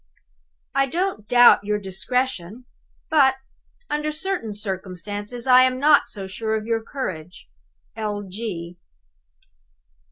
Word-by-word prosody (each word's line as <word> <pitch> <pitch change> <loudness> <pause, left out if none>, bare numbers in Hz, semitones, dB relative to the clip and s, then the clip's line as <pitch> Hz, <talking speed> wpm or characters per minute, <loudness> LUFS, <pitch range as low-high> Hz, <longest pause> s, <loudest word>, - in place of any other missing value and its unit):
I 275 0 +2
don't 340 - -2
doubt 245 -3 +7
your 210 +1 0
discretion; 210 +2 -2 0.5
but 275 -4 +5 0.5
(under 300 +1 -2
certain 320 - -3
circumstances) 205 +3 -5
I 255 -1 +7
am 255 0 +3
not 290 +2 +5
so 195 -3 -7
sure 220 +4 -3
of 215 -1 -3
your 225 0 0
courage. 180 - -6 0.5
L. 205 -2 -4
225 Hz, 105 wpm, -23 LUFS, 205-265 Hz, 0.5 s, doubt